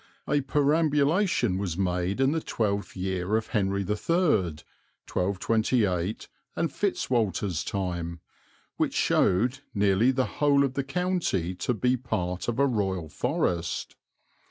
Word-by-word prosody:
A 145 - +2
perambulation 150 - +2
was 90 -4 -3
made 90 +2 -1
in 135 +1 +3
the 160 +1 0
twelfth 100 -6 -2
year 95 +2 0
of 110 - -4
Henry 100 -3 0
III - - -3 1.2
(1228 100 0 0 0.3
and 165 - -1
Fitz 200 -2 -1
Walter's 100 -7 0
time), 85 -3 -3 0.6
which - - 0
showed 120 +9 +2 0.2
nearly 100 +4 +3
the 130 -1 +2 0.2
whole 140 -1 +5
of 135 -2 -1
the 140 - -1
county 135 - -1
to 115 +7 -2
be 125 +3 +1
part 95 -7 -3
of 120 -1 -1
a 140 - +4
Royal 95 - -1
Forest. 85 +1 -1
105 Hz, 130 wpm, -27 LUFS, 95-135 Hz, 1.2 s, whole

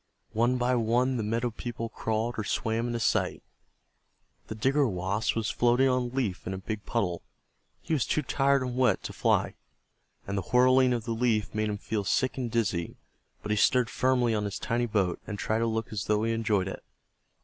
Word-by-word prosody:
One 120 +3 +2
by 125 +1 +1
one 125 +2 +2
the - - -1
meadow 115 +3 -1
people 115 0 -5
crawled 110 +1 -2
or - - -1
swam 115 +3 -1
into 120 -1 -2
sight. 110 - 0 1.0
The 110 - -5
Digger 135 +5 +2
Wasp 95 +2 -1
was 115 -1 -1
floating 120 +2 +3
on 125 -1 +2
a - - -2
leaf 120 -9 -3
in 95 - -2
a - - -5
big 105 +2 -6
puddle. 90 -8 -1 0.6
He - - -2
was 140 -7 +1
too 155 - 0
tired 140 0 +2
and 125 -1 -4
wet 130 0 +2
to - - -6
fly, - - +1 0.7
and 100 - -3
the 100 - 0
whirling 130 +5 +4
of 120 -2 -1
the 120 - -3
leaf 115 -3 0
made 110 0 0
him 105 - -2
feel 105 0 -3
sick 130 +6 +1
and 125 -3 -3
dizzy, 95 -7 -1 0.5
but 105 - -3
he 105 - +1
stood 125 +3 +3
firmly 125 -3 +2
on 105 -1 0
his 100 - -3
tiny 120 0 -1
boat 100 -5 0
and 105 - -4
tried 110 +2 0
to 115 - +1
look 110 0 -2
as 105 -1 -3
though 105 0 +1
he 115 0 +1
enjoyed 105 -4 +1
it. 95 - -6
115 Hz, 205 wpm, -28 LUFS, 105-125 Hz, 1.0 s, whirling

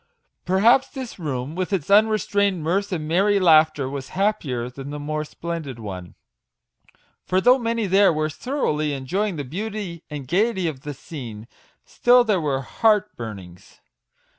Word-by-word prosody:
Perhaps 220 +8 +4
this 260 -7 -8
room, 140 -3 -4
with 185 +3 -3
its 195 -2 -2
unrestrained 200 -3 +3
mirth 195 +5 0
and 160 -4 -3
merry 200 +5 +3
laughter, 155 -5 +4
was 135 -1 -6
happier 155 - 0
than 135 +2 -8
the 145 - -5
more 150 +1 -3
splendid 160 -4 -6
one; 95 -6 -8 1.1
for 185 - +1
though 250 +6 +5
many 230 -2 -1
there 195 0 +5
were 155 -1 0
thoroughly 155 - -2
enjoying 185 +9 -2
the 145 - -4
beauty 190 +3 -5
and 145 -4 -7
gaiety 190 - +1
of 140 -5 -5
the 145 0 -6
scene, 120 -7 -9 0.4
still 245 0 +4
there 210 -6 +1
were 135 -3 -1
heart 210 +5 +1
burnings. 100 -4 -10
165 Hz, 150 wpm, -23 LUFS, 140-205 Hz, 1.1 s, though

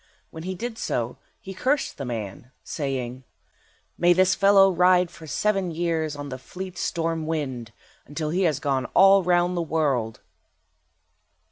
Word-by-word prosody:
While 160 - -8
he 185 +3 -4
did 230 +4 -6
so 120 0 -3 0.2
he 190 - -9
cursed 275 - -1
the 140 - -4
man, 115 -1 -6
saying— 130 -3 -4 0.8
"May 175 0 +5
this 185 +1 +3
fellow 195 -1 +5
ride 180 0 +3
for 160 - -12
seven 195 +2 0
years 160 -2 -2
on 145 0 -7
the 130 -1 -6
fleet 185 +6 -8
storm 165 -2 -2
wind, 130 -8 -3 0.4
until 150 +1 -4
he 180 +3 0
has 155 -5 +1
gone 135 -3 -1
all 195 +1 +7
round 175 0 +2
the 175 - 0
world." 140 -9 -1
165 Hz, 150 wpm, -24 LUFS, 140-185 Hz, 0.8 s, all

